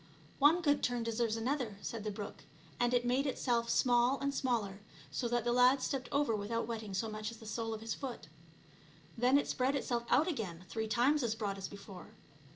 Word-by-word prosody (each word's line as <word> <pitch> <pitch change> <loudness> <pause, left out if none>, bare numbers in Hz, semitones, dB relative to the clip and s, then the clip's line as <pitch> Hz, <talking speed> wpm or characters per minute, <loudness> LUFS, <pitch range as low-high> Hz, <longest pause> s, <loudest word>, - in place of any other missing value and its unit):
" - - -25
One 320 +5 +5
good 290 -2 +3
turn 245 -1 0
deserves 230 0 0
another," 235 -3 -2
said 225 -3 -4
the 215 - -2
brook, 205 0 -7 0.4
and 245 0 +3
it 245 -1 +2
made 260 +4 +2
itself 240 -3 0
small 245 +2 +3
and 280 0 -1
smaller, 230 -8 -1 0.3
so 240 - -1
that 240 0 0
the 240 0 +1
lad 250 +2 +6
stepped 260 -1 -2
over 280 -5 +2
without 215 +3 -2
wetting 220 -3 -5
so 225 +4 0
much 215 0 -4
as 230 - -9
the 220 - -13
sole 225 +1 -3
of 220 -1 -4
his 225 0 -3
foot. 265 -4 -6 0.9
Then 250 +4 +4
it 285 - 0
spread 260 +2 +1
itself 240 -3 -1
out 305 - +4
again 185 - -4
three 220 +3 -3
times 255 +7 +3
as 230 -3 0
broad 200 -3 -3
as 195 - -4
before. 200 -2 -10
235 Hz, 210 wpm, -34 LUFS, 220-260 Hz, 0.9 s, lad